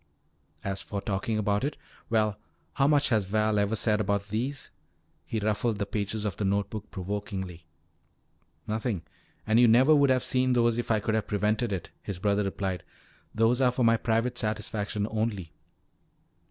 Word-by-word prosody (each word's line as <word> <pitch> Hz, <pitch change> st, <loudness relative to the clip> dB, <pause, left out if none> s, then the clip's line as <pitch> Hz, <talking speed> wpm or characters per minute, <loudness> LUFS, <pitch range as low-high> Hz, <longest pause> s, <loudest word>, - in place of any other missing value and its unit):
As 95 Hz, 0 st, -2 dB
for 100 Hz, -, -4 dB
talking 100 Hz, +2 st, -2 dB
about 105 Hz, +1 st, +1 dB
it 145 Hz, -, -2 dB, 0.3 s
well, 110 Hz, -2 st, +1 dB, 0.3 s
how 135 Hz, -, +3 dB
much 145 Hz, -1 st, +3 dB
has 110 Hz, -5 st, +2 dB
Val 105 Hz, +1 st, +1 dB
ever 100 Hz, +2 st, +1 dB
said 105 Hz, 0 st, +2 dB
about 100 Hz, 0 st, -1 dB
these?" 125 Hz, +6 st, -3 dB, 0.6 s
He 115 Hz, -, -2 dB
ruffled 110 Hz, +1 st, 0 dB
the 100 Hz, -, -1 dB
pages 105 Hz, +1 st, -2 dB
of 100 Hz, -5 st, -2 dB
the -, -, -2 dB
note 100 Hz, 0 st, 0 dB
book 110 Hz, -1 st, -6 dB
provokingly. 95 Hz, -3 st, -5 dB, 1.0 s
"Nothing. 110 Hz, -5 st, -2 dB, 0.4 s
And 110 Hz, +1 st, +3 dB
you 125 Hz, -, +7 dB
would -, -, +5 dB
never 140 Hz, +5 st, +6 dB
have 130 Hz, -2 st, +2 dB
seen 130 Hz, 0 st, +2 dB
those 120 Hz, -1 st, +3 dB
if 120 Hz, -, -3 dB
I 110 Hz, -2 st, +2 dB
could 110 Hz, -, -1 dB
have 110 Hz, -2 st, 0 dB
prevented 105 Hz, +3 st, 0 dB
it," 95 Hz, -3 st, -4 dB
his 100 Hz, -, -5 dB
brother 100 Hz, +2 st, +1 dB
replied. 95 Hz, -2 st, -2 dB, 0.5 s
"Those 115 Hz, +4 st, +3 dB
are 125 Hz, -, +5 dB
for 125 Hz, -1 st, +1 dB
my 115 Hz, 0 st, +5 dB
private 115 Hz, +2 st, 0 dB
satisfaction 105 Hz, -1 st, -2 dB
only." 105 Hz, -7 st, -2 dB
110 Hz, 170 wpm, -28 LUFS, 100-115 Hz, 1.0 s, you